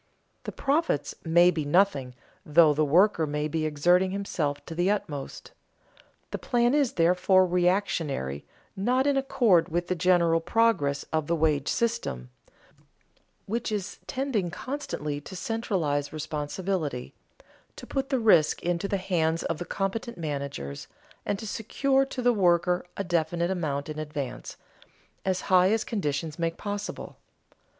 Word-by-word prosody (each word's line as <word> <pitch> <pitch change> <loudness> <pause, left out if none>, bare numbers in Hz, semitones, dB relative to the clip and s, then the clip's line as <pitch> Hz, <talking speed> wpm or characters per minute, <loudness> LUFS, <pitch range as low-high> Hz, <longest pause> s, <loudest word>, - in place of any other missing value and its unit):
The - - -4
"profits" 280 - 0
may 175 +2 +5
be 160 -3 -2
nothing, 145 -5 +2 0.3
though 155 -2 +5
the 155 +1 +1
worker 165 +2 +3
may 150 +1 -1
be 155 0 -1
exerting 175 +5 +3
himself 175 -7 -3
to - - -7
the 175 +3 +1
utmost. 150 -9 -4 0.8
The - - -3
plan 240 0 +1
is, 285 -4 +2
therefore, 180 +2 +4
reactionary, 175 - 0 0.3
not 250 +7 +1
in 285 -1 +2
accord 240 -11 +3
with 175 +2 -2
the 185 - +1
general 170 -2 +3
progress 175 -7 +1
of 155 -2 0
the 170 - +1
wage 150 -3 +1
system, 65 - -2 1.1
which 230 +3 -3
is 205 -1 -4
tending 255 -9 -1
constantly 210 - -4
to 190 - -10
centralize 180 -9 -1
responsibility, 155 -1 -3 0.6
to - - -10
put 270 0 -3
the 270 - +1
risk 175 -9 +4
into 175 +2 -1
the 200 - 0
hands 165 -4 0
of 165 +1 -4
competent 220 +4 -3
managers, 140 - -5 0.4
and 200 - 0
to 220 - -8
secure 270 +6 +1
to 265 -2 -5
the 245 0 +4
worker 180 -2 +2
a 200 - -1
definite 170 0 0
amount 145 -6 -2
in 155 0 -5
advance, 150 -4 -5 0.7
as 185 -1 0
high 185 0 +4
as 220 0 +1
conditions 155 - -3
make 165 0 -1
possible. 205 0 -5
175 Hz, 140 wpm, -27 LUFS, 155-205 Hz, 1.1 s, may